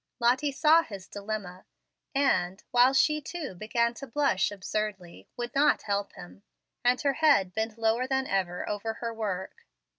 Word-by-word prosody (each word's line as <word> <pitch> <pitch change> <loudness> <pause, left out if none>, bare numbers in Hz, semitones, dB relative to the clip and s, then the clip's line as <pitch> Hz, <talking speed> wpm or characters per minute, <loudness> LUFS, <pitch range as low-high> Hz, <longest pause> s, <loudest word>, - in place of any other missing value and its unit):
Lottie 255 +4 +2
saw 310 +4 +5
his 200 - -9
dilemma, 200 -3 -6 0.5
and, 195 -9 +1
while 245 +1 +6
she 305 +3 +3
too 310 - -6
began 235 +5 0
to 275 +3 -9
blush 275 -5 +1
absurdly, 195 - -5
would 240 0 -4
not 290 +1 +3
help 200 -1 -2
him, 90 +2 -12 0.4
and 245 +1 +3
her 280 -1 +2
head 275 - +3
bent 220 +1 -3
lower 230 +3 +1
than 265 0 0
ever 185 -4 -2
over 215 +2 -3
her 230 0 -4
work. 200 -4 -5
225 Hz, 155 wpm, -28 LUFS, 195-265 Hz, 0.5 s, while